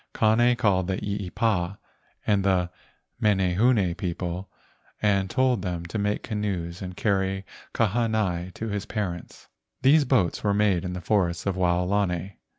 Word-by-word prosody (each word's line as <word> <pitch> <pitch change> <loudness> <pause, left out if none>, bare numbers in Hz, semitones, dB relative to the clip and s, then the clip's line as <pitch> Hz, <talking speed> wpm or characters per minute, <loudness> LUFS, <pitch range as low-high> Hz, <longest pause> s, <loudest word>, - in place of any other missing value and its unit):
Kane 120 +3 +4
called 100 -7 +2
the 95 -1 -1
eepa 100 -1 -1 0.5
and 100 -2 +2
the 90 -2 +1 0.5
menehune 95 0 +3
people 90 0 -4 0.5
and 100 -2 +2
told 130 -3 +2
them 90 -2 -3
to 95 +6 -4
make 105 +1 -1
canoes 95 -5 -3
to 95 - -5
carry 95 -1 0 0.3
Kahanai 110 -5 0
to 115 - -4
his 100 0 -3
parents. 95 -6 -5 0.4
These 145 +2 +6
boats 120 -10 +1
were 100 -1 +2
made 100 -4 +2
in 90 - -3
the 90 - -5
forests 85 -3 0
of 100 -2 0
Wao¬ 90 -1 +1
lani. 95 -2 -1
95 Hz, 145 wpm, -26 LUFS, 90-105 Hz, 0.5 s, These